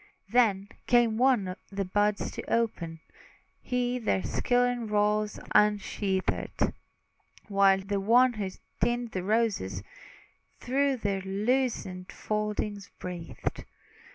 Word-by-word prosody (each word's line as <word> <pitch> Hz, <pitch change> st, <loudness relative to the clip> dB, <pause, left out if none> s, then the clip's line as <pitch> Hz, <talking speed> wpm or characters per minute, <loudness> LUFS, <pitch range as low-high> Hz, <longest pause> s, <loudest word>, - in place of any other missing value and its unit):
Then 210 Hz, -5 st, +3 dB, 0.2 s
came 235 Hz, -2 st, +4 dB
one 240 Hz, -8 st, +3 dB, 0.2 s
the 195 Hz, 0 st, -2 dB
buds 205 Hz, +2 st, +1 dB
to -, -, -5 dB
open; 170 Hz, -8 st, -1 dB, 0.6 s
He 250 Hz, 0 st, -1 dB
their 95 Hz, -, 0 dB
silken 245 Hz, -, +1 dB
rolls 210 Hz, 0 st, +1 dB
unsheathed, 205 Hz, -2 st, +1 dB, 0.8 s
While 195 Hz, -1 st, +4 dB
the 200 Hz, +1 st, -2 dB
one 240 Hz, +5 st, +5 dB
who 205 Hz, -4 st, -3 dB, 0.3 s
tints 240 Hz, -1 st, 0 dB
the 185 Hz, -, -1 dB
roses, 195 Hz, -, 0 dB, 0.8 s
Through 275 Hz, +1 st, +1 dB
their 200 Hz, -4 st, -1 dB
loosened 195 Hz, -2 st, -1 dB
foldings 210 Hz, -1 st, -3 dB
breathed. 175 Hz, -2 st, -5 dB
210 Hz, 100 wpm, -28 LUFS, 195-240 Hz, 0.8 s, one